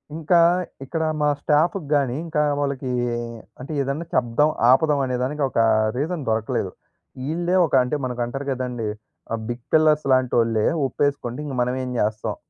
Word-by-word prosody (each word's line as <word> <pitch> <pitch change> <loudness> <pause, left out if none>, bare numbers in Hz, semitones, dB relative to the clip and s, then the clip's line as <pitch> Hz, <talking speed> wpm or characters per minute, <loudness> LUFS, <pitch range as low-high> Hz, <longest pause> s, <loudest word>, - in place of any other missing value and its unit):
ఇంకా 165 +2 +3 0.5
ఇక్కడ 160 +4 -2 0.2
మా 150 - +3
స్టాఫ్‌కి 155 +2 +1
గాని, 135 -4 +1
ఇంకా 155 -2 0 0.2
వాళ్ళకి 140 -2 -2 0.7
అంటే 130 +5 -8
ఏదన్నా 140 +5 -3
చెప్దాం, 125 +5 +2 0.2
ఆపుదాం 145 +2 +4
అనే 125 - -2
దానికి 145 +2 -2
ఒక 115 - -1 0.4
రీజన్ 155 +1 -2
దొరకలేదు. 110 0 -1 0.6
ఈళ్ళే 175 +4 0
ఒక 155 - -7
అంటే 125 +4 -2
మనకు 125 -1 -3
అంటారు 135 +4 -5
కదండీ! 125 -4 -3 0.4
ఆహ్, 115 -1 -2
బిగ్ 120 0 -5
పిల్లర్స్ 155 -1 +4
‌‌‌‌‌‌‌‌‌‌‌‌లాంటోళ్ళే 120 -4 +2 0.2
ఒప్పేసుకోండి 135 -1 -2
ఇంక 140 - -5
మనమేం 125 +1 -1
చేస్తాం. 105 0 -1
135 Hz, 145 wpm, -23 LUFS, 125-150 Hz, 0.7 s, ఆపుదాం